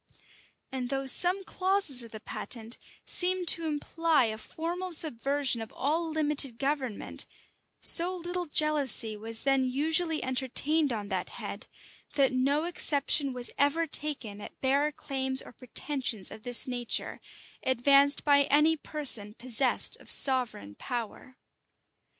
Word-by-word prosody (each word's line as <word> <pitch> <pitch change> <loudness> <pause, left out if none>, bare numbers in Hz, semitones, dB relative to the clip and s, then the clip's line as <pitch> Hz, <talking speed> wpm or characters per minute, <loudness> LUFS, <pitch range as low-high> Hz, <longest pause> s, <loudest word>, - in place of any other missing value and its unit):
And 255 -2 -5
though 270 0 -3
some 355 +8 +3
clauses 375 -8 +3
of 230 - -5
the 220 - -9
patent 230 +1 -6 0.3
seemed 365 0 +2
to 330 -1 +3
imply 310 -1 0
a 220 -1 -5
formal 350 +7 -4
subversion 275 -4 +1
of 220 - -9
all 320 +4 -2
limited 300 -5 +2
government, 270 -5 -3 0.5
so 355 +2 +5
little 355 0 -5
jealousy 290 -8 0
was 225 +2 -2
then 270 -1 +1
usually 315 +5 -1
entertained 265 +4 +2
on 210 -3 -5
that 185 -2 -3
head, - - -8 0.5
that 270 -2 +2
no 275 +4 0
exception 285 -4 0
was 250 -2 -2
ever 285 +4 +1
taken 270 -9 +1
at - - -11
bare 280 +3 0
claims 265 -2 -1
or - - -4
pretensions 250 -4 -1
of 220 - -11
this 245 +1 +1
nature, 245 -2 -2 0.4
advanced 275 +2 +3
by 285 -1 +4
any 300 +3 +3
person 255 -9 -1
possessed 250 +1 -1
of - - -18
sovereign 250 - +2
power. 245 - -7
275 Hz, 130 wpm, -28 LUFS, 245-310 Hz, 0.5 s, so